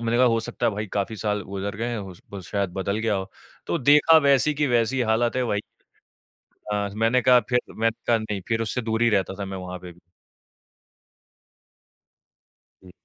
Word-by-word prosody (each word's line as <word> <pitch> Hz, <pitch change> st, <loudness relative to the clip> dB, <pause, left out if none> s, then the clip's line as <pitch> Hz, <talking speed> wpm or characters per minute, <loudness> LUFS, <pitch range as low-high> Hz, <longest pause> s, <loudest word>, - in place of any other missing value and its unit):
मैंने 115 Hz, 0 st, 0 dB
कहा 130 Hz, -, +5 dB
हो 115 Hz, -1 st, +3 dB
सकता -, -, -3 dB
है -, -, +2 dB
भाई 105 Hz, +2 st, -4 dB
काफ़ी 105 Hz, +2 st, -2 dB
साल 105 Hz, 0 st, -1 dB
गुज़र 100 Hz, +1 st, -5 dB
गए 115 Hz, -, -2 dB
हैं 120 Hz, -2 st, -3 dB
हो 95 Hz, -2 st, -7 dB
स -, -, -19 dB
वो 100 Hz, -, -6 dB
शायद 100 Hz, 0 st, -2 dB
बदल 100 Hz, +2 st, -2 dB
गया 110 Hz, -2 st, 0 dB
हो 95 Hz, 0 st, -4 dB, 0.4 s
तो 170 Hz, -, -1 dB
देखा 150 Hz, +4 st, +6 dB
वैसी 140 Hz, +1 st, +3 dB
की 150 Hz, 0 st, +1 dB
वैसी 120 Hz, +1 st, +1 dB
हालत 115 Hz, +2 st, +1 dB
है 130 Hz, -, +1 dB
भाई। 105 Hz, -3 st, -1 dB, 1.1 s
हाँ 100 Hz, -1 st, -1 dB
मैंने 115 Hz, +3 st, +2 dB
कहा 125 Hz, +1 st, +6 dB
फ़िर 125 Hz, 0 st, +3 dB
मैंने 115 Hz, 0 st, 0 dB
कहा 115 Hz, -1 st, +4 dB
नहीं। 105 Hz, -3 st, -4 dB
फ़िर 115 Hz, -1 st, 0 dB
उससे 115 Hz, +3 st, -2 dB
दूर 110 Hz, 0 st, -2 dB
ही 115 Hz, -, +4 dB
रहता 95 Hz, -3 st, 0 dB
था 100 Hz, -, -3 dB
मैं 95 Hz, 0 st, -6 dB
वहाँ 90 Hz, 0 st, -6 dB
पे 90 Hz, 0 st, -10 dB
भी। 85 Hz, -, -19 dB, 2.8 s
हुँ। 90 Hz, -, -14 dB
110 Hz, 200 wpm, -24 LUFS, 100-120 Hz, 2.8 s, देखा